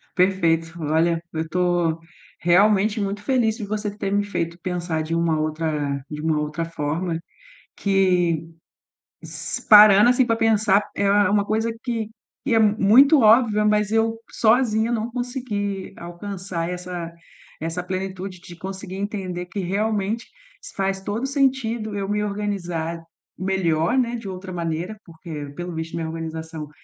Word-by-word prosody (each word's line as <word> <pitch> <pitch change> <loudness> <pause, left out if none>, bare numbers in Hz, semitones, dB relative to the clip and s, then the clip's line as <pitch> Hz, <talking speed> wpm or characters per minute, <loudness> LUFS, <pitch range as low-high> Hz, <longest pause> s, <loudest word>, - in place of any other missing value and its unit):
Perfeito. 165 -3 +2
Olha, 165 +2 +1
eu 160 - -1
estou 175 -1 0 0.4
realmente 205 +4 +3
muito 200 +1 -3
feliz 230 -3 +1
de 215 - -5
você 210 0 -3
ter 195 -2 -3
me 205 0 +2
feito 170 -4 -3
pensar 175 -3 -2
de 160 +1 -4
uma 165 -2 +1
outra 155 -3 -2
de 150 -1 -6
uma 155 -1 +1
outra 150 +2 -2
forma, 165 +2 -2 0.6
que 180 -5 +2 0.7
s - - -5
parando, 210 0 +9
assim, 250 0 +3
para 230 -1 +1
pensar 215 -3 +3
é - - -1
é 200 - +3 0.2
uma 205 0 +3
coisa 220 +2 0
que 230 -4 -2 0.4
que 265 -4 +1
é - - +5
muito 220 +7 +6
óbvia, 220 -1 +5
mas 210 -1 +2
eu 225 0 +1
sozinha 225 -1 +2
não 235 0 -1
consegui 230 -6 -3
alcançar 175 -1 -5
essa 180 -2 -5 0.5
essa 165 +3 -3
plenitude 185 0 -5
de 175 0 -12
conseguir 190 +1 -7
entender 195 -3 -4
que 195 +3 -5
realmente 205 +3 -1 0.5
faz 195 0 -1
todo 205 +6 -3
o - - +1
sentido 260 -6 0
eu 195 -1 -3
me 210 +1 0
organizar 175 -5 -3 0.4
melhor, 180 -1 +1
né, 240 -1 +1
de 225 -4 -7
outra 185 0 -7
maneira, 170 +4 -3
porque 160 -3 -8
pelo 175 -1 -5
visto 160 0 -5
minha 165 -1 -2
organização 160 -1 -6
190 Hz, 150 wpm, -23 LUFS, 170-215 Hz, 0.7 s, parando